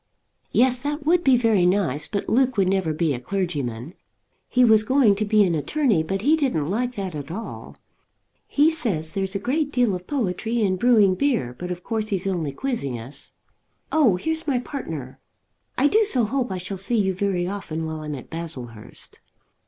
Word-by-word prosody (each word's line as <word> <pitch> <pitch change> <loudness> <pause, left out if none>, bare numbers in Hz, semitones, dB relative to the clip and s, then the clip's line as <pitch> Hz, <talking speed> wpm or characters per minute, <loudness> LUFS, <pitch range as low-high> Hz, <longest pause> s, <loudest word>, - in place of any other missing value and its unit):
"Yes; 250 0 +4
that 290 +2 -4
would 345 +2 +3
be 265 -2 +5
very 225 -6 +3
nice; 180 -7 0
but 200 -2 -3
Luke 255 0 +2
would 195 -2 +3
never 190 -4 +1
be 155 -1 0
a 120 - -4
clergyman. 145 - -3 0.6
He 250 0 +4
was 220 -2 +6
going 245 -1 +4
to 215 - 0
be 210 0 +4
an 180 -3 +1
attorney, 215 - +1
but 190 +5 -3
he 300 +5 +5
didn't 245 - 0
like 245 +4 -1
that 195 -3 -4
at 145 -1 -6
all. 210 +7 -7 0.7
He 300 +3 +3
says 175 - -2
there's 195 0 -2
a - - +3
great 285 +8 -1
deal 245 -6 +2
of 180 0 -6
poetry 230 -3 -1
in 190 -2 +2
brewing 215 -4 +4
beer, 225 - 0
but 180 +7 -6
of 180 0 -5
course 220 -2 -2
he's 195 -4 -1
only 175 -7 -1
quizzing 140 - -3
us. 130 +5 -9 0.6
Oh, 285 -11 +4
here's 320 - -3
my 270 -3 +2
partner. 160 - -6 0.6
I 260 - +3
do 435 +10 +4
so 265 - +3
hope 250 +1 -1
I 190 - -2
shall 180 +2 -6
see 230 +5 0
you 190 -3 +1
very 185 -2 -1
often 175 -4 -4
while 160 0 -4
I'm 150 -1 -5
at 130 - -11
Baslehurst." 130 -10 -7
200 Hz, 190 wpm, -23 LUFS, 165-250 Hz, 0.7 s, was